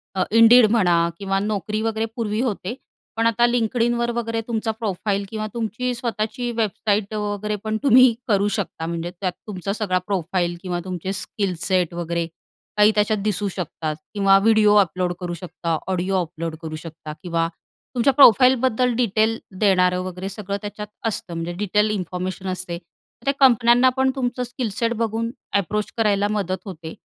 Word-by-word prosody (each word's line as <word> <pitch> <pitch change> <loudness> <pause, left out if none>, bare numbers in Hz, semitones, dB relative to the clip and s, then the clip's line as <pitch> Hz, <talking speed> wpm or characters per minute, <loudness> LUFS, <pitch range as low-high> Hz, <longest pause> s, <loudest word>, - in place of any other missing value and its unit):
अ, 190 - 0 0.2
Indeed 230 +1 +8
म्हणा 185 -7 +3 0.2
किंवा 195 -1 -1
Naukri 210 +1 -2
वगैरे 225 0 0
पूर्वी 220 -2 -2
होते, 220 -4 -2 0.4
पण 225 0 +3
आता 230 +1 +3
LinkedInवर 235 0 +1
वगैरे 230 -1 -2
तुमचा 225 -1 -1
प्रोफाईल 205 -2 -2
किंवा 215 0 -4
तुमची 235 +2 -2
स्वतःची 235 +1 -3
वेबसाईट 210 -1 0
वगैरे 210 0 -2
पण 220 0 -1
तुम्ही 255 -2 +7
करू 205 -3 +2
शकता. 180 -5 -4
म्हणजे 170 +1 -3
त्यात 185 -2 0 0.2
तुमचा 195 -1 -3
सगळा 200 -4 0
प्रोफाईल 180 -2 -1
किंवा 180 -2 -3
तुमचे 185 +1 -4
स्किल 190 0 -3
सेट 185 -3 +1
वगैरे 170 0 -2 0.5
काही 210 +1 +6
त्याच्यात 210 0 +2
दिसू 210 -1 0
शकतात 160 -3 -4 0.2
किंवा 195 -1 +5
व्हिडिओ 215 0 +4
अपलोड 180 -1 -2
करू 175 -2 -4
शकता, 170 -1 -3
ऑडिओ 190 +1 -1
अपलोड 165 -1 -5
करू 160 -1 -5
शकता 155 -1 -8
किंवा 165 -2 0 0.5
तुमच्या 250 +3 +3
प्रोफाइलबद्दल 255 -1 +5
डिटेल 220 0 +2 0.2
देणारं 180 -3 +3
वगैरे 185 +1 -5
सगळं 200 0 -4
त्याच्यात 210 0 -6 0.2
असतं 200 -5 -4
म्हणजे 165 +1 -4
डिटेल 210 +2 +2
इन्फॉर्मेशन 185 -1 -4
असते. 180 -1 -4 0.5
त्या 275 - +2
कंपन्यांना 245 -1 +5
पण 265 0 +3
तुमचं 250 -1 -2
स्किलसेट 235 -2 -2
बघून 230 +1 -2 0.3
एप्रोच 210 +2 -2
करायला 205 -2 +2
मदत 195 -3 -2
होते 165 -4 -8
205 Hz, 155 wpm, -22 LUFS, 185-225 Hz, 0.5 s, Indeed